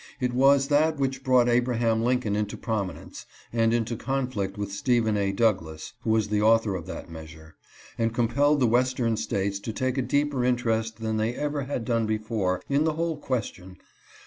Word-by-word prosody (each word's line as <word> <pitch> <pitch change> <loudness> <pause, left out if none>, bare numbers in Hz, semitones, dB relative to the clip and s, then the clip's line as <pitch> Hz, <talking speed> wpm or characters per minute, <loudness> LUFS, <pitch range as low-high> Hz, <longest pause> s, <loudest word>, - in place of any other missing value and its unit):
It 125 -1 -1
was 135 +2 +4
that 155 +2 +3
which 135 -1 -2
brought 125 -2 +4
Abraham 120 -2 +1
Lincoln 120 -3 0
into 105 -1 -2
promi 100 -6 -2
nence, - - -11 0.3
and 115 -1 +2
into 115 0 0
conflict 125 -6 -3
with 100 -1 -4
Stephen 110 +1 +1
A. 100 -1 0
Douglas 95 -5 -1
(who - - -4
was 110 -1 +2
the 105 0 +1
author 110 -1 +3
of 90 -3 -5
that - - -7
measure) 80 -1 -11 0.4
and 115 0 +1
compelled 140 +5 +2
the - - +5
Western 120 -1 +1
States 100 -2 -2
to 110 - -5
take 130 +4 -1
a - - +2
deeper 140 +1 0
interest 115 -3 0
than 110 -1 -1
they 110 +3 -1
ever 145 -2 -2
had 130 -4 -3
done 115 -3 0
before 105 -4 -1
in 140 +2 +2
the 160 0 +1
whole 165 0 -2
question. 95 -9 -4
115 Hz, 185 wpm, -26 LUFS, 105-130 Hz, 0.4 s, the